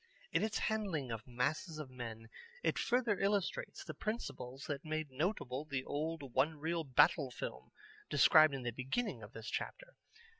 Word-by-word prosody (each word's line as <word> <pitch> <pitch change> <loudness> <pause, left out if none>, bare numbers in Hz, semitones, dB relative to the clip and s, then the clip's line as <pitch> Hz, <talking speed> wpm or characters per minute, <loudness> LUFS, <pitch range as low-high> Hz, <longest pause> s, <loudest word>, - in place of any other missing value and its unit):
In - - +3
its 215 0 0
handling 190 - -1
of 115 +1 -5
masses 140 +6 -1
of 150 -4 -6
men 115 -3 -6 0.4
it - - +2
further 240 -5 +2
illustrates 200 -1 0
the - - -6
principles 140 - -4
that 140 -2 -3
made 155 -2 -2
notable 140 - -1
the 140 -4 -2
old 145 -3 -3
one 150 +5 +3
reel 165 +2 -1
Battle 140 +1 +4
film - - -6 0.4
described 155 -3 +7
in 130 - -5
the 120 - -1
beginning 135 - -2
of 105 - -10
this 115 0 -6
chapter. - - -4
150 Hz, 160 wpm, -36 LUFS, 130-175 Hz, 0.4 s, described